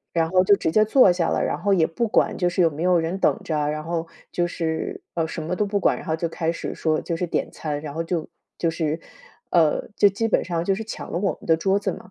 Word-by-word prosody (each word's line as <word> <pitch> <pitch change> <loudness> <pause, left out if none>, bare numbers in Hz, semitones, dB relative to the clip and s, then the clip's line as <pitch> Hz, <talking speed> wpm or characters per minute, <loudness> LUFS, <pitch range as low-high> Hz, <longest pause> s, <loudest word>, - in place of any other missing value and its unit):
然 165 -1 +2
后 185 0 +4
就 200 - +6
直 160 - -1
接 215 +5 +4
坐 220 -2 +6
下 175 -1 0
了， - - 0
然 - - -1
后 205 - +1
也 170 -4 +4
不 230 +8 -1
管 - - +2
就 180 -2 +1
是 175 - -1
有 165 -2 +5
没 155 +3 -6
有 180 -1 +4
人 165 +4 -2
等 - - +2
着， 150 -2 -1
然 155 0 -3
后 165 0 -3 0.2
就 175 0 0
是 160 -2 -3
呃， 165 -2 0
什 160 - -5
么 175 +3 -3
都 210 - +1
不 200 0 -1
管， - - +3
然 - - -10
后 160 - 0
就 165 +1 -1
开 165 0 -1
始 - - -5
说 155 -1 0
就 170 - -3
是 180 +1 -2
点 - - -2
餐， 150 -2 -4
然 150 -2 -7
后 165 +1 -2
就 165 -2 -2 0.3
就 165 - +1
是 160 -1 -2 0.5
呃， 165 -4 +2
就 205 - +6
基 225 +4 -1
本 - - +2
上 170 -1 -2
就 195 - +2
是 220 +3 -5
抢 220 - -7
了 170 - -1
我 195 0 +1
们 - - -13
的 160 - +4
桌 195 +4 +1
子 - - -2
嘛。 220 - -11
170 Hz, 300 characters per minute, -23 LUFS, 160-190 Hz, 0.5 s, 就